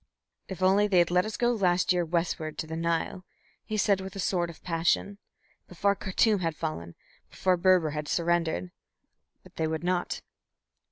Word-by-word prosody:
"If 190 -1 -5
only 195 +3 +4
they 195 -3 +2
had 175 0 +4
let 180 +2 +3
us 215 - -5
go 240 0 +2
last 185 -4 +2
year 175 -1 +1
westward 165 -2 -2
to - - -3
the 160 +1 -6
Nile," 170 +2 -1 0.4
he 215 -1 -4
said 200 -1 +2
with 190 0 -8
a - - -6
sort 175 -2 0
of 170 - -13
passion. 175 +4 0 0.5
"Before 200 +3 +1
Khartum 205 +2 +1
had 165 -3 -2
fallen, 85 - -5 0.3
before 185 -1 +1
Berber 180 -3 +3
had 150 0 -4
surrendered. 165 - 0 0.7
But - - -19
they 160 - 0
would 160 +1 -3
not." 180 0 -1
175 Hz, 175 wpm, -28 LUFS, 165-190 Hz, 0.7 s, only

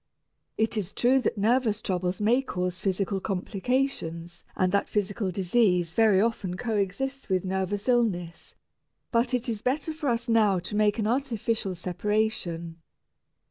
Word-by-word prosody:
It 220 0 0
is 200 -2 -3
true 255 +2 +3
that 235 - -1
nervous 220 0 +2
troubles 180 -3 -2
may 230 +5 +3
cause 180 -8 -3
physical 195 0 -1
complications 190 -4 -2
and 185 -1 +1
that 200 +1 +1
physical 200 -1 -1
disease 180 -2 +2
very 215 -2 +4
often 200 -4 0
coexists 230 +5 -2
with 185 -1 +1
nervous 190 +3 -2
illness, 200 -9 0 0.6
but 240 +2 +2
it 250 +1 -2
is 220 -3 -2
better 290 +5 -1
for 305 -3 -2
us 235 +1 -1
now 215 -4 +4
to 180 +4 -4
make 210 0 +3
an 220 - 0
artificial 230 -5 -1
separation. 175 -2 -2
210 Hz, 140 wpm, -27 LUFS, 185-235 Hz, 0.6 s, very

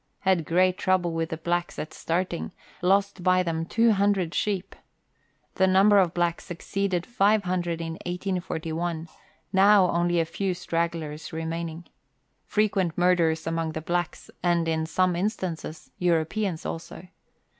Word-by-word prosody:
Had 185 -5 +2
great 185 +2 +2
trouble 185 -3 +1
with 165 0 -2
the 160 - -4
blacks 175 +2 -2
at 155 - -5
starting; 175 +1 -2 0.3
lost 195 +1 +2
by 185 0 +3
them 165 -1 -2
200 200 -6 +2
sheep. 195 -2 -2 0.8
The 190 - +3
number 195 +2 +5
of 180 -3 +2
blacks 175 +1 -1
exceeded 180 0 -2
500 185 -7 +1
in 165 -1 -4 0.2
1841 175 -2 -3 0.5
now 195 -1 +6
only 175 0 +1
a 165 - +2
few 185 +3 -2
stragglers 165 -3 -3
remaining. 165 +1 -4 0.6
Frequent 195 -5 +1
murders 175 -3 +2
among 165 -1 -2
the 160 - -3
blacks, 175 +1 -3
and, 170 -2 +1
in 160 0 0
some 185 +1 +1
instances, 180 -5 -4
Europeans 175 +1 0
also. 165 +2 -6
175 Hz, 130 wpm, -26 LUFS, 165-190 Hz, 0.8 s, now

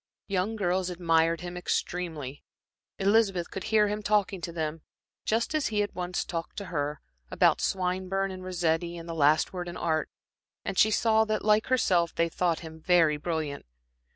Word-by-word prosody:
Young 195 +3 -1
girls 185 -2 0
admired 165 -1 +2
him 175 0 -6
extremely. 165 -6 -3 0.5
Elizabeth 195 -3 +2
could 190 - -5
hear 215 -1 +4
him 210 +1 -2
talking 205 -3 +1
to 170 - -4
them, 160 -1 -3 0.4
just 230 +6 0
as 310 -2 +1
he 210 -2 0
had 205 - -2
once 180 0 -2
talked 165 -1 -5
to 200 - -4
her, 145 -1 -1 0.3
about - - +3
Swinburne 190 +1 -1
and 185 0 -8
Rossetti 170 -1 -1
and 165 0 -9
the 165 - -4
last 155 +2 +3
word 180 -1 -4
in 175 - -7
Art, 160 -2 0 0.6
and 195 - -2
she 215 - +5
saw 220 0 +3
that, 215 -1 -2
like 210 0 +4
herself, 185 -10 +2
they 165 0 +2
thought 170 0 0
him 160 -1 -9
very 165 -3 +4
brilliant. 155 - -3
180 Hz, 175 wpm, -28 LUFS, 165-200 Hz, 0.6 s, she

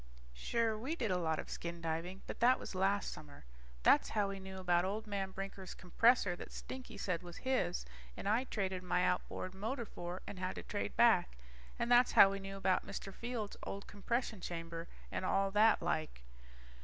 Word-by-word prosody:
Sure, 225 - 0
we 260 +9 -3
did 230 - -1
a 180 - +2
lot 160 -2 0
of - - -5
skin 170 0 -5
diving, 165 +3 -3
but - - -7
that 250 +2 +6
was - - -7
last 195 +2 +1
summer. 145 - -12 0.4
That's - - +5
how 205 -2 +1
we 195 0 -5
knew 190 0 -8
about 175 -2 +2
old 205 +4 -2
man 200 -2 -2
Brinker's 195 -1 -6
compressor 195 +1 +3
that - - -9
Stinky 250 -4 -7
said 180 -4 -1
was 175 -1 -9
his 250 -10 +1 0.3
and - - -4
I 225 +5 +2
traded 190 -6 -2
my 180 0 +1
outboard 185 0 -1
motor 225 +6 -3
for 175 -2 -6
and 190 - -7
had 185 0 -2
to - - -6
trade - - -3
back. - - +4 0.4
And 235 +1 -1
that's 245 +1 +6
how 195 - +9
we 195 - -3
knew 195 0 -6
about 190 -1 +2
Mr. 195 - -6
Fields' 230 -3 -4
old 200 0 -5
compression 220 0 -2
chamber, 165 -1 -5 0.2
and - - -2
all 195 +1 +2
like - - -19
that. 210 -7 +3
195 Hz, 190 wpm, -36 LUFS, 180-220 Hz, 0.4 s, how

